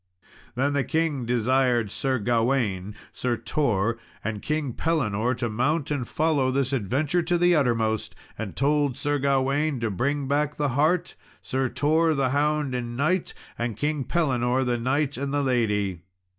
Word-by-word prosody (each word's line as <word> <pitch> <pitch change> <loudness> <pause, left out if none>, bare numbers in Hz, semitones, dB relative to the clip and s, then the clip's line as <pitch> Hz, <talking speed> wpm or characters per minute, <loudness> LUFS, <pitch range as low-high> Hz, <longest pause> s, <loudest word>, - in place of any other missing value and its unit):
Then 140 +3 +1
the 140 -1 +1
king 150 -5 -1
desired 120 -2 +2
Sir 135 +1 0
Gawain, 115 -4 0 0.2
Sir 120 -2 -1
Tor, 115 -6 0 0.2
and 105 -1 -3
King 150 -4 -2
Pellinore 125 -8 0
to 120 0 -2
mount 140 +7 0
and 135 -5 -1
follow 150 -4 +1
this 135 0 0
adventure 135 - 0
to 175 +1 +1
the 175 0 +4
uttermost; 115 -6 0 0.2
and 105 -3 -6
told 145 -1 +1
Sir 145 0 0
Gawain 140 +1 +1
to 115 -2 0
bring 140 +8 -1
back 145 +1 0
the 145 -1 +1
hart, 155 +7 +1 0.3
Sir 130 0 -1
Tor 160 +3 +2
the 135 -2 +1
hound 150 -1 +1
and 120 -1 -4
knight, 170 +6 0 0.2
and 120 -3 -2
King 150 +2 -1
Pellinore 130 -5 +1
the 120 -1 0
knight 135 +3 0
and 140 +1 -3
the 145 0 +1
lady. 105 -8 0
135 Hz, 155 wpm, -25 LUFS, 120-150 Hz, 0.3 s, the